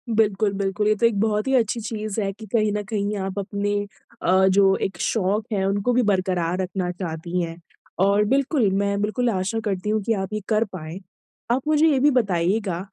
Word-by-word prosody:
बिल्कुल, 210 -1 +2
बिल्कुल 200 +2 +1
तो 230 - +1
एक 220 -4 +2
बहुत 210 +1 0
ही 265 - +1
अच्छी 230 -1 +1
चीज़ 215 -1 -4
है 195 -1 -1
कि 220 +2 -11
कहीं 215 -2 +2
न 210 - -2
कहीं 210 -1 -1
आप 190 +1 -3
अपने 205 +1 -2 0.5
अ, 190 +1 +4
जो 195 0 +4
एक 190 - -2
शौक़ 210 +1 0
है 195 -2 0
उनको 200 +5 0
भी 250 - +3
बरकरार 185 -4 0
रखना 185 -1 -2
चाहती 175 0 -4
हैं। 165 -1 -5 0.5
और 200 +1 +3
बिल्कुल 265 -1 +2
मैं 200 0 0
बिल्कुल 235 +4 0
आशा 195 +2 -1
करती 200 0 -2
हूँ 215 0 +1
कि 225 - +1
आप 195 -1 -3
ये 215 - -1
कर 215 0 +3
पाएँ। 165 +1 -7 0.5
आप 260 +4 0
मुझे 310 +1 +4
ये 280 -4 +3
भी 290 +2 +4
बताइएगा 195 -4 0
205 Hz, 200 wpm, -23 LUFS, 190-220 Hz, 0.5 s, अ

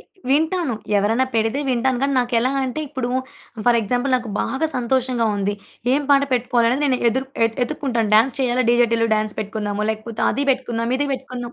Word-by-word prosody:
ఎ - - -16 0.3
వింటాను. 315 -2 +1 0.2
ఎవరన్నా 225 +6 +1
పెడితే 225 +4 +1
వింటాను 255 0 +1
కాని, 275 0 +1
నాకెలాంటే 255 +3 0
ఇప్పుడు, 260 -2 -3 0.6
ఫర్ 240 -1 +5
ఎగ్జాంపుల్ 245 +5 -1
నాకు 240 -3 -5
బాగా 280 +4 -1
సంతోషంగా 250 -1 0
ఉంది. 200 +1 -1 0.4
ఏం 285 +2 +2
పాట 280 0 +6
పెట్టుకోవాలి 240 -1 +2
అనేది 265 +4 0
నేను 260 -3 +2
ఎదుర్ 260 +4 -1 0.2
ఎతు 225 - -7
ఎతుక్కుంటాను. 240 -5 -2
డాన్స్ 230 +4 +4
చేయాలా? 255 0 +1
'డీజే 240 0 +4
టీల్లు' 230 0 +1
డాన్స్ 215 0 -1
పెట్టుకుందాము, 210 0 -3
లేకపోతే 220 +1 -5
అది 280 - -1
పెట్టుకుందాం, 240 -3 -1
ఇది 290 - 0
పెట్టుకుందాం. 250 -2 -6
245 Hz, 170 wpm, -21 LUFS, 230-265 Hz, 0.6 s, పాట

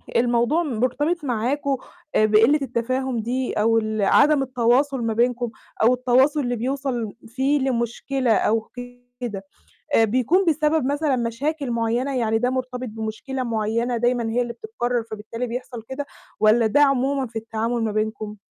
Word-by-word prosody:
الموضوع 240 +7 +2
مرتبط 290 +6 -1
معاكم 270 +3 -1 0.4
آآ 215 - +5
بقِلة 225 +8 +5
التفاهم 255 0 -1
دي 250 +3 -2
أو 225 +2 +2
ال 215 -1 -1
عدم 285 +8 +4
التواصل 260 +2 +1
ما 230 -1 0
بينكم 240 +1 +1 0.3
أو 235 +3 +6
التواصل 255 +4 +3
اللي 245 -3 -1
بيوصل 250 -2 -2
فيه 265 +5 +1
لمشكلة 255 0 -1
أو 220 +1 +2 0.6
كده 210 -6 -5 0.6
بيكون 255 - +2
بسبب 305 -2 +2
مثلًا 285 0 +1
مشاكل 255 +4 -2
معيّنة، 235 +4 0
يعني 225 -2 +1
ده 245 +2 +1
مرتبط 255 -1 -3
بمشكلة 225 +5 -4
معيّنة، 230 +1 -1
دايمًا 240 -1 +1
هي 240 +2 +1
اللي 240 -1 -3
بتتكرر، 245 - -2
فبالتالي 220 +3 -5
بيحصل 240 -1 -6
كده، 275 +2 -4 0.3
والّا 220 +2 +4
ده 290 +7 +3
عمومًا 275 -1 +2
في 225 - -23
التعامل 225 +1 -2
ما 220 - 0
بينكم؟ 215 0 -3
245 Hz, 145 wpm, -23 LUFS, 225-270 Hz, 0.6 s, أو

